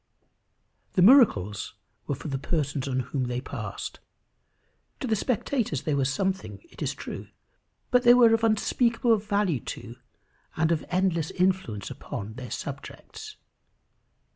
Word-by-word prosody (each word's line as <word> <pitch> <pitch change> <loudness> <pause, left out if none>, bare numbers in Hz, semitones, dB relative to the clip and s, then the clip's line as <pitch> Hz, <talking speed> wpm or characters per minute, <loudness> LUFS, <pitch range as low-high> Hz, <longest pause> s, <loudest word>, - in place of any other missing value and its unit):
The 180 - +4
miracles 105 - +5 0.3
were 140 - -1
for 145 - -8
the 135 -2 -2
persons 145 -2 -2
on 130 -1 0
whom 130 +1 -2
they 125 0 -2
passed. - - -6 1.0
To - - -3
the 225 -3 +1
spectators 225 - -1
they 155 - 0
were 140 -2 +1
something, 190 - -2
it - - -14
is - - -1
true; - - -7 0.6
but 250 -1 +5
they 240 0 +7
were 235 -2 +6
of 225 0 +1
unspeakable 230 +1 +2
value 200 - 0
to, 120 +1 -8 0.6
and 160 +1 +2
of 165 - +1
endless 180 -3 +1
influence 180 - -1
upon 105 +2 -6
their 125 +1 -8
subjects. 425 - -7
175 Hz, 140 wpm, -27 LUFS, 135-225 Hz, 1.0 s, they